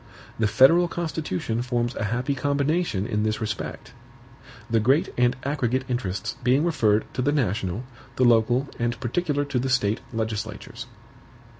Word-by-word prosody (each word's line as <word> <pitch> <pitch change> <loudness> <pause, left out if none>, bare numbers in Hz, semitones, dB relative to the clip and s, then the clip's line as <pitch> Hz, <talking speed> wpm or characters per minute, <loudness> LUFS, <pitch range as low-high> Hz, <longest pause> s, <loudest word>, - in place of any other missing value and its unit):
The 110 - +3
federal 135 +11 +5
Constitution 155 - -3
forms 120 -1 -1
a - - -2
happy 125 +6 -1
combination 140 - 0
in 105 -3 -1
this 110 0 0
respect; 105 -2 -5 0.7
the 115 -1 +2
great 135 +9 +2
and 125 0 +2
aggregate 130 -3 0
interests 115 -3 -3
being 130 +5 +3
referred 110 -11 +2
to - - -2
the 140 +3 +2
national, 105 -6 -1 0.3
the 130 - +3
local 120 +3 +3
and 120 0 -1
particular 145 +3 -1
to 140 -3 -1
the 130 +2 -1
State 115 -4 +1
legislatures. 110 -2 -4
120 Hz, 145 wpm, -25 LUFS, 110-140 Hz, 0.7 s, federal